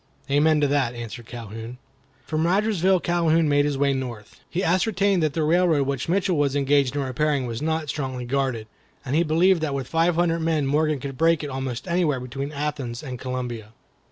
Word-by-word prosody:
"Amen 150 +2 +4
to 145 - +3
that!" 135 -4 0
answered 120 0 -7
Calhoun. 115 +1 -8 0.5
From 160 +1 0
Rogersville 190 -1 +2
Calhoun 165 -2 +2
made 145 0 +3
his 145 -2 -1
way 140 0 +2
north. 120 -5 -6
He 180 +3 -2
ascertained 195 +1 +2
that 155 -2 +1
the 160 - 0
railroad 160 -2 +3
which 135 +1 -3
Mitchell 185 -1 +1
was 145 -1 +1
engaged 140 -1 +2
in 145 - 0
repairing 135 +1 0
was 115 0 -4
not 160 0 -1
strongly 130 -4 -4
guarded, 130 -3 -1 0.4
and 135 +2 -1
he 165 - +4
believed 170 +2 +3
that 145 -3 -1
with 135 -2 -3
five 165 +1 +2
hundred 170 -1 +1
men 160 -3 0
Morgan 150 +1 +1
could 135 -1 -7
break 165 -1 +3
it 145 - -4
almost 130 +1 -4
anywhere 170 -6 +1
between 135 +3 -5
Athens 145 -5 -4
and 130 -4 -6
Columbia. 125 -4 -5
145 Hz, 190 wpm, -24 LUFS, 130-165 Hz, 0.5 s, Amen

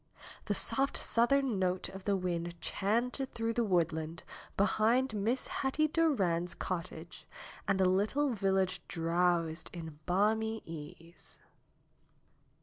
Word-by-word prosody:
The - - 0
soft 275 +1 +2
southern 245 -2 +2
note 185 0 0
of 190 0 -10
the 200 -1 +2
wind 175 -2 -3
chanted 240 +9 -1
through 230 0 -1
the 235 - +1
woodland 165 -4 0 0.3
behind 220 +5 +2
Miss 220 +5 0
Hetty 290 +3 0
Durand's 190 - +1
cottage 170 -1 -5 0.4
and 195 -1 +2
the 190 - +4
little 210 +10 +2
village 190 -3 +1
drowsed 165 0 0
in 160 -4 -8
balmy 220 +4 +1
ease. 165 +1 -9
190 Hz, 115 wpm, -32 LUFS, 170-230 Hz, 0.4 s, the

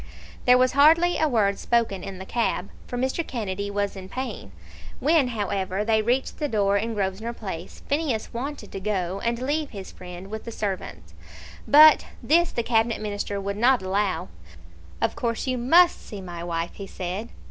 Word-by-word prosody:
There 250 0 +7
was 255 0 +3
hardly 325 +6 +5
a 315 - +3
word 205 -7 +1
spoken 230 -6 0
in 195 -1 -6
the 190 - -8
cab, 225 -3 -1 0.2
for 245 - -4
Mr. 260 +6 0
Kennedy 200 -4 -3
was 200 0 -2
in 190 -1 -9
pain. 220 - -5 0.5
When, 300 -1 +3
however, 200 -3 -2
they 220 -1 +3
reached 245 +4 -1
the 295 - 0
door 200 -5 +1
in 225 +3 -1
Grosvenor 205 +4 -2
Place, 190 -6 -7
Phineas 280 -7 -1
wanted 250 -2 -5
to 195 - -5
go, 190 -2 -2
and 235 0 0
leave 290 +4 -1
his 195 -3 -8
friend 180 +2 -10
with 220 0 -5
the 230 - -7
servants, 185 - -5 0.5
but 305 +2 +8 0.2
this 340 +2 +3
the 235 - -2
Cabinet 230 0 +1
Minister 205 -1 -3
would 200 +1 -3
not 245 0 +3
allow. 190 - -1 0.7
"Of - - +1
course 230 -2 -2
you 255 -2 -1
must 340 +9 +5
see 210 - -8
my 175 -2 -7
wife," 170 -1 -2
he 195 - -8
said. 190 +6 -5
215 Hz, 180 wpm, -25 LUFS, 195-255 Hz, 0.7 s, but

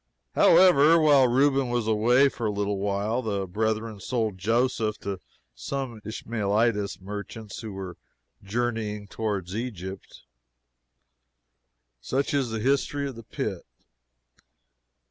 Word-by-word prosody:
However, 165 -3 +6
while 145 -4 +5
Reuben 135 +1 +2
was 120 -2 0
away 115 +5 +4
for 120 -4 -3
a - - 0
little 100 -1 -2
while, 100 +4 -1
the 100 -4 -2
brethren 110 +2 -2
sold 110 -3 -2
Joseph 115 +1 +1
to 100 -2 -4 0.3
some 120 - -5
Ishmaelitish 110 -1 -1
merchants 105 +2 -7
who 110 -3 -7
were 95 -2 -7 0.4
journeying 105 -1 -3
towards 100 -5 -3
Egypt. 100 -5 -6 1.8
Such 135 - -1
is 135 -4 +1
the 110 0 -3
history 140 +3 0
of 135 - -7
the 115 - -9
pit. 100 -4 -4
110 Hz, 115 wpm, -26 LUFS, 100-125 Hz, 1.8 s, However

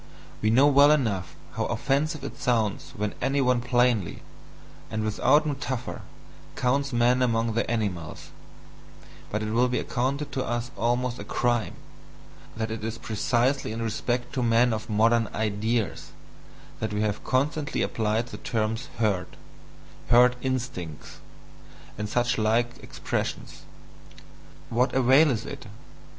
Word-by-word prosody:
We 110 - +2
know 130 +5 +5
well 145 0 +6
enough 110 -12 +1 0.2
how - - -2
offensive 155 +3 -1
it - - -7
sounds 110 -5 0
when 105 0 -2
any 140 +1 +1
one 125 -2 +2
plainly, 120 -6 +1 0.7
and 110 0 -2
without 130 +8 +3
metaphor, 135 -4 -3 0.5
counts 140 +2 0
man 120 +1 +3
among 115 -2 +1
the 115 - -1
animals, 100 -9 -3 1.0
but 105 +1 -2
it 110 - -3
will 125 +2 +3
be 125 - -1
accounted 135 +4 -2
to 130 - -2
us 120 +1 -3
almost 120 +3 0
a - - -5
CRIME, 120 +1 0 0.8
that 110 0 -2
it 110 -1 -5
is 115 +1 -3
precisely 120 +4 0
in 115 +1 -4
respect 120 +3 -2
to 130 - -1
men 120 0 +3
of 110 +1 -5
"modern 115 +1 +3
ideas" 110 +1 -1 0.7
that 110 -1 -3
we 105 - 0
have 105 -1 -1
constantly 145 +3 0
applied 110 +2 -1
the - - -7
terms 110 0 -2
"herd," 100 -6 +1 0.8
"herd 125 +1 +6
instincts," 125 - -4 0.8
and 105 0 -4
such 120 +1 +1
like 115 +3 +1
expressions. - - -4 1.1
What 125 +3 +1
avail 135 +4 +5
is 115 -4 -1
it? - - -8
120 Hz, 135 wpm, -26 LUFS, 110-125 Hz, 1.1 s, well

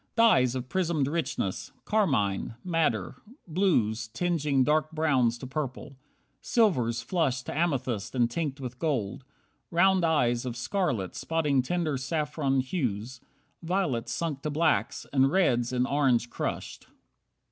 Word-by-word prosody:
Dyes 130 - +4
Of 130 -1 -4
prismed 170 -4 0
richness: 145 - -2
Carmine. 120 - +1
Madder. 155 - 0 0.3
Blues 120 - +1
Tinging 145 +1 +1
dark 155 +3 +2
browns 135 -7 +2
to 130 - -8
purple. 135 0 -5 0.5
Silvers 125 - +2
flushed 130 -5 0
To - - -5
amethyst 135 - -1
and 120 -2 +3
tinct 145 0 -3
with 125 -2 -7
gold. 135 -5 -2 0.5
Round 185 +1 +3
eyes 125 -8 +2
Of 125 -2 -4
scarlet, 120 - -1
spotting 150 -5 +1
tender 155 +1 -1
saffron 145 0 0
hues. 125 - -3 0.4
Violets 165 -9 -1
sunk 155 -5 -3
to 150 - -2
blacks, 155 +2 +1
and 135 -1 +4
reds 125 -9 +2
in 125 0 +1
orange 130 -4 +1
crushed. - - -4
140 Hz, 125 wpm, -28 LUFS, 125-165 Hz, 0.5 s, Dyes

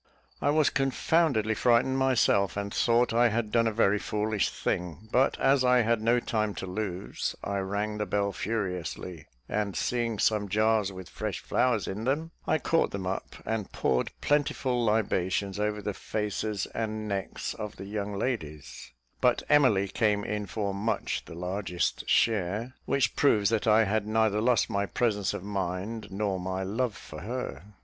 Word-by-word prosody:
I - - +2
was 155 0 +3
confoundedly 135 -4 +2
frightened 120 +3 +3
myself, 110 -8 +3
and 100 0 -3
thought 120 0 +3
I 120 +1 +5
had 110 -1 -1
done 115 0 +3
a - - +1
very 105 -2 +3
foolish 105 0 0
thing; 90 +3 -3
but 130 +2 +2
as 135 -1 +4
I 125 0 +5
had 115 0 +1
no 120 +2 +3
time 110 -3 -1
to - - -5
lose, 95 -1 -3
I 100 0 -1
rang 105 +2 -2
the 105 - -1
bell 100 +1 0
furiously, 90 -6 -4 0.2
and 105 -2 -2
seeing 120 -2 -1
some 105 -1 +1
jars 110 0 +2
with 95 -2 -9
fresh - - -4
flowers 120 -5 +1
in 105 +4 -4
them, 155 +5 0 0.2
I 155 - +3
caught 165 +1 +1
them 95 -1 -5
up 95 +1 -4
and 110 -3 -2
poured 65 - 0
plentiful 135 -4 +1
libations 100 -3 0
over 105 0 -1
the 105 - -2
faces 105 -1 -2
and 110 -1 -3
necks 100 -2 -3
of 105 -1 -6
the 95 - -8
young 100 0 -4
ladies; 75 - -4 0.3
but - - +3
Emily 125 -10 +4
came 105 0 +1
in 105 -1 -3
for 100 -2 -2
much 105 +4 -2
the - - -10
largest 90 +1 -2
share, 110 +3 +1
which 135 -2 +1
proves 110 -8 +3
that 115 0 0
I 110 +1 +6
had 105 0 0
neither 110 -1 +2
lost 120 -2 +3
my 100 -2 -1
presence 105 -6 0
of - - -6
mind 100 +2 -3
nor 100 -1 -1
my 95 +1 -3
love 110 +4 -1
for 75 - -10
her. 105 - -6
105 Hz, 170 wpm, -28 LUFS, 100-115 Hz, 0.3 s, I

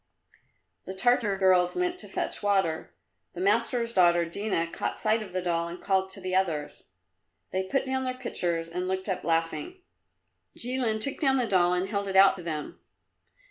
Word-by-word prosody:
The 190 - -6
Tartar 220 -1 +2
girls 185 -2 +3
went 360 0 -1
to - - -6
fetch - - -3
water. 195 -6 0 0.4
The 175 - -8
master's 230 +4 +1
daughter 175 -3 +4
Dina 170 0 -1
caught 165 - -4
sight 220 +1 +1
of 205 -4 -8
the 185 0 -2
doll, 170 -1 0
and 170 +1 -7
called 190 -1 0
to 190 - -6
the 185 -1 -4
others. 165 -6 -1 0.7
They 190 - 0
put 270 +6 0
down 265 0 -1
their 255 0 -3
pitchers 170 -9 -2
and 180 +2 -4
looked 190 +1 -2
up 190 -2 -2
laughing. 165 - -2 0.7
Jilin 245 -3 0
took 275 +6 0
down 270 -4 +3
the 255 -2 +2
doll 180 -4 +3
and 180 +1 -1
held 200 0 -2
it 190 - -3
out 195 0 +7
to - - -7
them. 155 -3 -5
190 Hz, 180 wpm, -27 LUFS, 175-230 Hz, 0.7 s, out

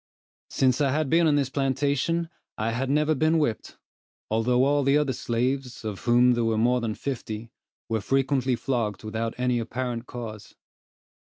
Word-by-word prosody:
Since 130 +1 +2
I 140 - +3
had 150 0 0
been 165 0 +4
on 150 - +3
this 140 -2 0
plantation, 140 +4 0 0.3
I 110 +2 -1
had 125 +3 -2
never 150 +2 +2
been 155 +3 +2
whipped, 135 -8 -2 0.5
although 125 +3 +2
all 145 +1 +3
the 140 +1 +3
other 145 -3 +1
slaves, 125 +1 -2
of 105 -3 -4
whom 120 +1 +4
there 120 -1 +1
were 115 -1 +1
more 125 +3 +2
than 110 -2 -2
fifty, 115 -4 -5 0.4
were 110 -2 -1
frequently 135 +1 +1
flogged 115 -6 -2
without 110 +1 -3
any 125 -1 +1
apparent 120 0 -4
cause. 110 -4 -8
125 Hz, 165 wpm, -26 LUFS, 115-140 Hz, 0.5 s, been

